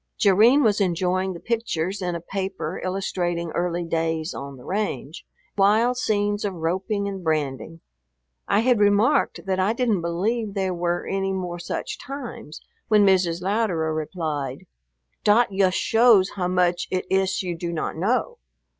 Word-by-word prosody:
Jerrine 220 +8 +5
was 210 -2 +2
enjoying 185 +1 0
the 170 - -8
pictures 200 -5 -2
in 180 -1 -2
a - - -3
paper 190 -2 -4
illustrating 175 -3 -2
early 175 +1 -1
days 165 0 -1
on 140 0 -7
the 125 - -14
range, 180 - -3 0.3
wild 220 +5 +4
scenes 205 -3 0
of 200 -3 -2
roping 190 +5 -1
and 195 -2 -5
branding. 155 0 -2 0.7
I 205 - +3
had 245 -1 +3
remarked 205 +2 +3
that 190 -1 -1
I 195 +4 +2
didn't 230 -6 0
believe 200 +6 -1
there 190 -2 0
were 175 0 -1
any 195 0 -1
more 180 -2 -4
such - - -5
times, 250 - -8 0.3
when 210 -2 +5
Mrs 180 -3 +2
Louderer 185 -6 0
replied, 150 -4 -4 0.6
"Dot 215 +2 +4
yust 190 -1 +2
shows 225 -4 +4
how 180 -3 -2
much 180 -1 +1
it 185 0 -2
iss 190 0 +1
you 175 -2 -3
do 170 +1 -4
not 165 -2 -3
know. 250 - -1
185 Hz, 155 wpm, -24 LUFS, 170-205 Hz, 0.7 s, Jerrine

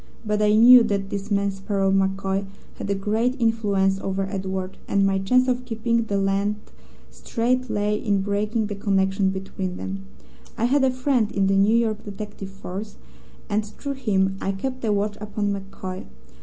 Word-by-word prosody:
But 210 0 0
I 210 0 +4
knew 245 +3 +9
that 200 -2 -2
this 200 +1 -4
man 200 -1 +1
Sparrow 195 0 -1
MacCoy 195 0 0 0.3
had - - -4
a 200 - +1
great 225 +7 0
influence 200 -4 +2
over 195 0 -2
Edward 190 -1 -4
and 200 0 +2
my 195 0 +2
chance 250 +7 +3
of 250 0 0
keeping 230 -1 0
the 200 -2 -1
lad 195 +1 +1 0.6
straight 235 - -1
lay 210 0 0
in 200 -2 +1
breaking 210 +2 0
the 205 - -4
connection 195 -1 +1
between 190 -1 -4
them. 195 0 -6 0.5
I 230 - +1
had 270 +3 +3
a 265 - +5
friend 255 -4 +1
in 195 -1 +1
the 195 0 +2
New 200 +3 +4
York 220 -2 0
detective 205 -1 -7
force, 195 +2 -7 0.5
and 215 0 0
through 220 +7 -6
him 195 -7 0
I 195 - -1
kept 255 +6 -4
a 220 - +1
watch 205 0 0
upon 205 -1 -2
MacCoy. 190 -1 -6
205 Hz, 175 wpm, -24 LUFS, 195-225 Hz, 0.6 s, knew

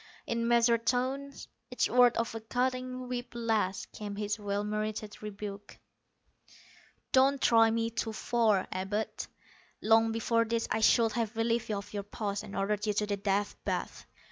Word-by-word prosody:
In 230 0 -1
measured 235 -1 +3
tones, 265 +3 -1 0.2
each 250 - +1
word 245 -1 +5
a 230 - +2
cutting 255 +2 -2
whip 245 0 -4
lash, 220 -4 0
came 205 -1 -6
his 210 +1 -2
well 205 0 -2
merited 215 0 -4
rebuke: 205 -1 -7 1.3
"Don't 270 +1 +4
try 225 -2 +5
me 230 0 0
too 230 0 -2
far, 220 -3 +1
Abud. 195 +4 -3 0.5
Long 225 +1 +4
before 230 +1 +1
this 230 0 -1
I - - +1
should 225 +1 +5
have 225 0 -2
relieved 230 0 0
you 210 - 0
of 200 +1 -8
your 205 - -2
post, 205 0 -4
and 200 - -9
ordered 205 +2 -1
you 210 - +2
to 210 - +1
the 205 -1 -2
Death 200 +1 0
Bath. - - -3
225 Hz, 160 wpm, -30 LUFS, 205-235 Hz, 1.3 s, word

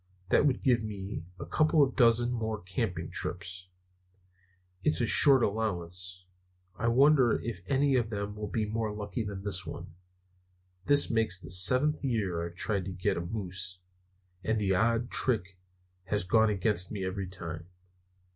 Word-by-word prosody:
"That 145 - +4
would 130 -3 -1
give 120 -3 +3
me 100 -5 -6
a - - -5
couple 155 -1 +3
of 135 - -1
dozen 120 0 +4
more 110 -3 -2
camping 90 -3 -4
trips. 90 +1 -4 1.2
It's 150 - +2
a 120 - +2
short 135 +3 +7
allowance. 90 -4 -3 0.5
I 115 - -2
wonder 130 0 +4
if 110 -6 -6
any 140 0 +2
of 115 -3 0
them 100 -1 -4
will 105 0 -5
be 110 +1 -1
more 110 0 -2
lucky 105 +3 -4
than 100 -2 -6
this 95 -2 -3
one. 85 -1 -8 0.9
This 145 0 +4
makes 110 -6 +1
the - - -8
seventh 130 +13 +3
year 100 -10 -1
I've 85 0 -7
tried 100 -1 -1
to 95 - -5
get 90 0 -1
a - - -2
moose; 90 -1 -4 0.7
and 110 0 0
the 100 -2 +1
odd 115 +4 +1
trick 95 -7 0 0.5
has 105 +1 -1
gone 110 +4 +3
against 95 -2 0
me 100 -3 -3
every 95 0 -3
time." 85 -2 -6
105 Hz, 160 wpm, -29 LUFS, 90-115 Hz, 1.2 s, short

